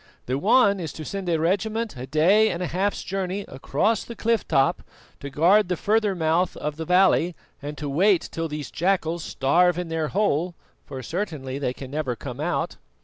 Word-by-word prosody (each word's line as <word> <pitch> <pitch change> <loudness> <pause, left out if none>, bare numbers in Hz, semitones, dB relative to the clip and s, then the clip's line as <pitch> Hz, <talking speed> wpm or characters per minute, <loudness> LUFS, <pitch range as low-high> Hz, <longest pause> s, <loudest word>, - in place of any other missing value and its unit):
The 130 +2 -1
one 200 - +4
is 165 -4 -4
to 155 - -8
send 195 0 -4
a 165 - +2
regiment 215 +5 -1
a 125 +1 -7
day 185 +10 +4
and 180 -1 -3
a - - 0
half's 190 +4 -1
journey 195 +1 -3
across 190 - 0
the 235 - -9
cliff 230 -2 0
top 135 0 +2 0.4
to 140 - -6
guard 175 +9 +4
the 180 - 0
further 210 0 +1
mouth 165 +2 +1
of 150 0 -4
the 160 - -4
valley 180 -1 +3 0.3
and 145 +1 -6
to 150 - -4
wait 180 +6 +3
till 165 0 -3
these 150 -1 -6
jackals 170 -2 0
starve 175 +7 +2
in 180 -2 -3
their 160 -1 -1
hole, 175 -2 0 0.3
for 130 -1 -7
certainly 150 - -4
they 135 -3 -1
can 130 0 -9
never 145 -4 -2
come 125 +2 -8
out." 170 +3 -2
170 Hz, 195 wpm, -24 LUFS, 150-195 Hz, 0.4 s, one